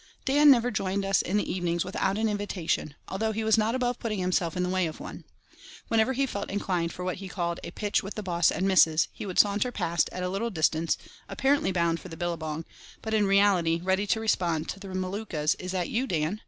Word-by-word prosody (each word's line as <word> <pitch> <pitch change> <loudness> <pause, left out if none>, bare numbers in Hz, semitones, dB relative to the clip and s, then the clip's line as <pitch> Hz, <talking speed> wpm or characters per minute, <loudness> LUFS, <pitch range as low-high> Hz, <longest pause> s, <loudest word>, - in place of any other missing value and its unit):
Dan 290 +2 +5
never 245 -2 +5
joined 195 -1 -1
us 195 -1 +3
in 195 +4 -1
the 210 - 0
evenings 175 -1 -1
without 190 +1 -1
an 220 +1 +1
invitation, 200 -7 -2
although 220 +3 -1
he 220 +1 -2
was 220 0 +4
not 225 +2 +1
above 245 -1 -1
putting 215 -3 -2
himself 180 -2 0
in 180 - +1
the 180 - -1
way 185 -2 +1
of 155 - -8
one. - - -9 0.6
Whenever 225 +3 +3
he 275 +2 +1
felt 200 -6 -5
inclined 180 -4 -1
for 180 - -6
what 185 - -2
he 195 0 -7
called 170 -2 -3
"a - - -5
pitch 205 -1 -1
with 195 - -7
the 215 - -4
boss 175 -3 +2
and 190 - 0
missus" 165 -4 +4
he - - -7
would 185 - -5
saunter 205 +4 +3
past 170 -6 0
at 180 - -4
a - - 0
little 200 +5 -2
distance, 160 -3 +1 0.3
apparently 275 -6 +1
bound 170 -2 +1
for 185 - -10
the 165 - -9
billabong, 165 -2 -3 0.4
but 220 - -3
in 210 -2 +3
reality 195 -4 +3
ready 190 +2 +1
to 220 - +1
respond 175 -7 0
to 195 - -5
the 195 - -9
Maluka's 185 -4 -1
"Is 180 0 -5
that 180 -2 -1
you, 250 +4 -1
Dan?" 165 +3 -1
190 Hz, 230 wpm, -27 LUFS, 170-215 Hz, 0.6 s, Dan